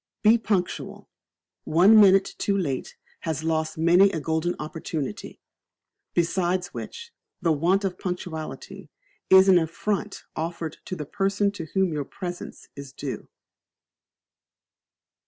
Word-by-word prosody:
Be 225 +2 +6
Punctual. 195 -5 -2 0.6
One 195 +7 +6
minute 195 -1 +5
too 200 -1 +1
late 140 -9 -3 0.2
has 160 -1 -3
lost 160 -1 -1
many 175 +5 +5
a 170 - -3
golden 160 +3 -1
opportunity. 155 -2 -5 0.8
Besides 175 +1 0
which, 465 0 -8 0.3
the 170 -3 +1
want 175 +6 +2
of 190 -2 -3
punctuality 175 0 -6 0.4
is 190 0 +8
an 185 -2 +7
affront 175 +5 -3
offered 165 -1 -4
to 185 - -4
the 150 -4 -5
person 195 +5 0
to 190 -5 -7
whom 190 -3 +2
your 145 -2 -2
presence 175 +2 -7
is 140 -1 -9
due. 135 0 -6
175 Hz, 120 wpm, -25 LUFS, 160-195 Hz, 0.8 s, is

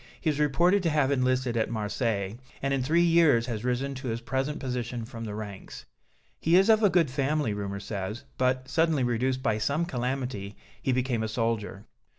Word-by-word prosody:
He 160 - +1
is 150 - -4
reported 170 +7 +3
to 170 - +1
have 150 -3 +2
enlisted 130 -2 +1
at 110 -1 +1
Marseilles, 105 -2 -2 0.2
and 140 0 -1
in 135 - +1
three 165 +7 +3
years 165 -8 +4
has 115 -3 -4
risen 125 +3 -1
to 130 0 -7
his 115 -1 -2
present 135 +5 -2
position 125 -3 -3
from 115 -1 -7
the 105 -1 -5
ranks. 105 -2 -8 0.5
He 165 +2 +3
is 195 +4 +5
of 220 0 +4
a 205 - +5
good 170 -6 +2
family, 140 -3 0
rumor 100 -1 -4
says, 100 +2 -5 0.2
but, 130 0 +1
suddenly 160 -4 +2
reduced 130 +2 0
by 110 -4 +1
some 145 +9 0
calamity, 125 - -3 0.3
he 130 - 0
became 125 -2 0
a 110 - -1
soldier." 110 -3 -2
130 Hz, 190 wpm, -28 LUFS, 115-145 Hz, 0.5 s, is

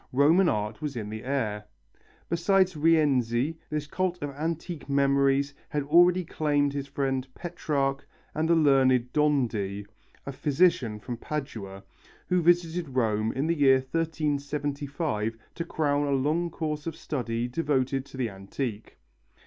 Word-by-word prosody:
Roman 160 +7 +5
art 105 +4 -2
was 150 -3 -3
in 105 -3 -4
the 110 0 -6
air. 110 -6 -2 0.6
Besides 185 +2 +2
Rienzi, 150 -3 +2
this 150 -1 -2
cult 180 +3 -2
of 145 - -3
antique 160 +2 -4
memories 140 0 +2 0.2
had 145 -1 -1
already 175 +4 +5
claimed 145 -3 0
his 140 -1 -4
friend 135 -2 -2
Petrarch 140 -5 -2 0.3
and 160 +1 -1
the 170 - +5
learned 130 -5 +3
Dondi, 115 -10 0 0.4
a 140 - -4
physician 135 -6 +1
from 120 +3 -6
Padua, 115 -10 -6 0.5
who 180 -1 +3
visited 170 -3 +1
Rome 110 -3 +1
in 135 +3 -1
the 165 - +2
year 135 -3 +5
1375 145 -6 -2 0.2
to 170 - -4
crown 145 -3 0
a - - 0
long 155 +6 0
course 155 -2 -4
of 165 - -3
study 120 -6 -3
devoted 135 -1 0
to - - -11
the 125 -2 0
antique. 105 +3 -6
140 Hz, 140 wpm, -27 LUFS, 125-160 Hz, 0.6 s, Roman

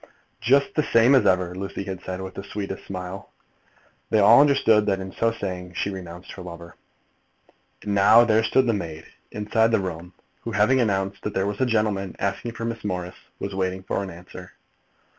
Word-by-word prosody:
"Just 140 - +3
the 155 - +2
same 120 -2 +4
as 125 -7 +5
ever," 90 -2 +2
Lucy 95 +1 -5
had 95 -2 -6
said, 95 0 -5
with 95 0 -7
the 100 - -7
sweetest 100 -1 -6
smile. 90 0 -7 0.8
They 110 - +2
all 110 +5 +7
understood 115 -7 +4
that, 95 -1 +1
in 95 0 -6
so 115 +3 0
saying, 90 -4 -6
she 100 - -1
renounced 90 -2 -9
her 95 - -9
lover. 85 -1 -10 1.1
And 105 - -2
now 105 +4 +6
there 110 -1 +3
stood 130 +3 +3
the 115 - +2
maid, 80 -6 -5 0.2
inside 110 +2 +1
the 115 - +2
room, 90 -1 -6 0.3
who, 115 - -6
having 110 +6 +3
announced 100 -3 -1
that 105 - -5
there 95 - +1
was 100 +2 -3
a 130 - +3
gentleman 105 -5 0
asking 100 +4 -3
for 115 - -5
Miss 115 -1 -4
Morris, 90 -3 -3 0.2
was 100 - -5
waiting 95 0 -2
for 100 - -2
an 100 - -5
answer. 90 +1 -11
100 Hz, 195 wpm, -24 LUFS, 95-110 Hz, 1.1 s, all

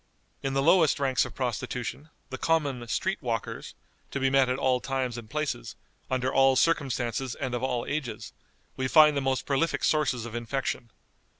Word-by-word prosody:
In 135 0 -2
the 135 - +2
lowest 165 -2 +4
ranks 135 -2 +2
of - - -9
prostitution, 125 +3 -3 0.2
the 130 - -5
common 145 -7 0
"street 190 +11 -1
walkers," 115 -5 -4 0.3
to 140 - -3
be 135 0 +2
met 135 -1 +4
at 130 - 0
all 130 -2 +2
times 130 -2 -2
and 115 -3 -8
places, 150 - -3 0.3
under 130 0 0
all 135 0 +5
circumstances 130 -5 0
and 130 -3 -4
of 120 - -2
all 125 -2 -1
ages, 145 -5 -4 0.4
we 130 - -1
find 150 +1 +6
the 140 - +1
most 135 -1 0
prolific 145 +4 0
sources 135 -6 +1
of 120 - -8
infection. 120 0 -3
130 Hz, 175 wpm, -28 LUFS, 125-140 Hz, 0.4 s, find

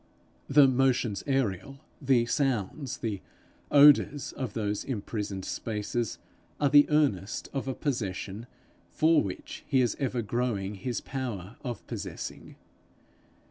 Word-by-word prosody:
The 140 0 +7
motions 125 -5 +1
aerial, 135 -1 -1 0.2
the 130 -4 +3
sounds, 130 0 -1
the 105 -5 -3 0.5
odours 145 0 +6
of 130 -3 -5
those 105 -2 -1
imprisoned 105 -5 -4
spaces, 110 +1 -3 0.4
are 145 - +3
the 145 0 +7
earnest 135 - +1
of 135 -1 -3
a 130 - -2
possession 110 -4 -3 0.4
for 160 0 +4
which 95 -3 -6
is 125 -5 +2
ever 130 -4 -1
growing 105 -3 -1
his 120 +4 -4
power 120 -7 -5
of 120 -3 -5
possessing. - - -7
120 Hz, 115 wpm, -28 LUFS, 105-135 Hz, 0.5 s, The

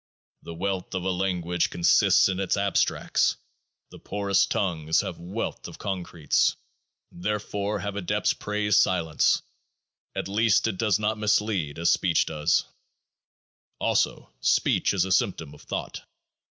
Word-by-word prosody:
The 85 - -9
wealth 95 +1 -3
of 90 - -2
a 95 - 0
language 90 -2 -1
consists 85 +1 +4
in 95 -1 -2
its 95 -1 0
Abstracts; 100 0 +1 0.6
the - - -12
poorest 100 -1 0
tongues 80 -5 0
have - - -6
wealth 95 +7 -5
of - - -11
Concretes. 90 -5 0 0.6
Therefore 105 +1 -3
have 100 +1 -4
Adepts 100 -4 0
praised 105 0 +1
silence; 80 -4 +1 0.7
at - - -3
least 105 +2 +2
it 110 -5 -2
does 105 -4 +2
not 110 +1 -1
mislead 105 -8 0
as 85 0 +2
speech 85 -4 +2
does. 75 -1 +1 1.1
Also, - - 0
Speech - - +2
is 95 -1 +2
a 95 - -4
symptom 80 -5 0
of 75 - -15
Thought. - - -5
95 Hz, 135 wpm, -26 LUFS, 85-105 Hz, 1.1 s, consists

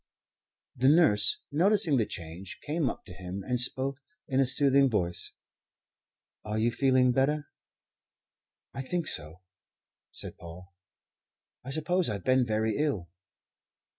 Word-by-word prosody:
The 130 +2 +3
nurse, 150 -10 +4
noticing 170 -1 +3
the 110 - +1
change, 85 +3 -7
came 150 -1 0
up - - -8
to 90 - -10
him 95 +1 -7
and 125 -1 -1
spoke 130 +2 0 0.3
in 135 -1 0
a 135 - +3
soothing 135 +1 +4
voice. 90 -6 -1 1.1
"Are 105 0 -3
you 115 +2 +2
feeling 130 0 +3
better?" 145 +3 0 1.2
"I 135 - -4
think 170 +5 -2
so," 80 +4 -4 0.7
said - - -1
Paul. 90 +3 -12 0.9
"I 130 - -8
suppose 160 +4 0
I've 100 -4 -4
been 130 -1 +3
very 110 0 0
ill." 140 - -1
130 Hz, 130 wpm, -29 LUFS, 100-140 Hz, 1.2 s, nurse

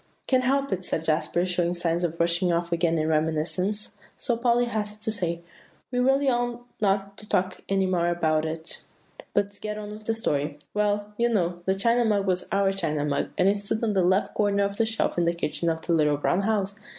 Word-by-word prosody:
"Can't 255 -1 +2
help 275 +1 +1
it," 185 0 -3
said 160 -2 -2
Jasper, 165 +3 +1
showing 175 -1 0
signs 170 0 0
of 170 -1 -2
rushing 170 +2 +2
off 170 0 -1
again 165 -1 +1
in 155 0 0
reminiscence; 160 +7 -1 0.2
so 240 - 0
Polly 240 +1 +2
hastened 210 -2 -4
to 220 - 0
say, 170 -5 -2 0.5
"We 250 - 0
really 270 +2 +3
ought 240 -1 0 0.2
not 200 0 0
to 210 - -8
talk 185 0 0
any 195 -1 +2
more 180 -2 +1
about 160 -3 +1
it, 160 +1 -4 0.5
but 205 0 0
get 210 0 -4
on 210 -1 -6
with 215 0 -10
the 225 - 0
story. 145 -8 -1 0.2
Well, 210 0 0
you 235 0 +2
know, 175 -5 0
the 190 - +2
China 235 +4 +3
Mug 205 -3 +1
was 185 -1 0
our 195 0 +2
China 155 -6 -1
Mug, 145 - -1
and 185 - +4
it 200 +1 +3
stood 205 +3 -3
on 220 -2 +1
the 190 - +3
left 185 +3 +2
corner 200 -1 +2
of 200 0 -2
the 225 - +2
shelf 220 -5 0
in 170 - +2
the 170 - +2
kitchen 170 0 -1
of 160 0 -2
The 170 - +1
Little 150 -2 +3
Brown 175 +6 +1
House." 200 -1 -1
195 Hz, 220 wpm, -26 LUFS, 170-215 Hz, 0.5 s, and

